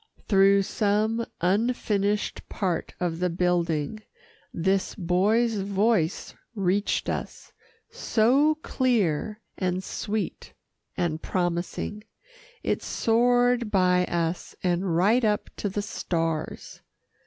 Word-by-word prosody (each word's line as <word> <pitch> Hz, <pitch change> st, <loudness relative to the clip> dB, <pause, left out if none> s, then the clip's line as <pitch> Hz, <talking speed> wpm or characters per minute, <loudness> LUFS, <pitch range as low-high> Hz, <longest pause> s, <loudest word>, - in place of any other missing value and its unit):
Through 195 Hz, -1 st, +5 dB
some 215 Hz, +3 st, 0 dB, 0.2 s
unfinished 205 Hz, +1 st, 0 dB
part 180 Hz, -5 st, -2 dB
of 170 Hz, -2 st, -2 dB
the 180 Hz, 0 st, +1 dB
building, 175 Hz, +1 st, 0 dB, 0.5 s
this 190 Hz, +3 st, 0 dB
boy's 210 Hz, +5 st, +2 dB
voice 200 Hz, -3 st, 0 dB, 0.2 s
reached 200 Hz, 0 st, 0 dB
us -, -, -5 dB, 0.4 s
so 285 Hz, -, +3 dB
clear, 215 Hz, -, 0 dB, 0.2 s
and 185 Hz, 0 st, -1 dB
sweet 210 Hz, +2 st, -4 dB, 0.4 s
and 170 Hz, -3 st, -1 dB
promising. 175 Hz, +3 st, -2 dB, 0.6 s
It -, -, 0 dB
soared 245 Hz, 0 st, +2 dB
by 180 Hz, -2 st, +3 dB
us, 170 Hz, 0 st, -2 dB
and 180 Hz, -1 st, 0 dB
right 210 Hz, +8 st, +3 dB
up 210 Hz, -1 st, 0 dB
to 205 Hz, -, -2 dB
the 205 Hz, +2 st, -3 dB
stars. 165 Hz, -5 st, -3 dB
195 Hz, 95 wpm, -26 LUFS, 180-220 Hz, 0.6 s, Through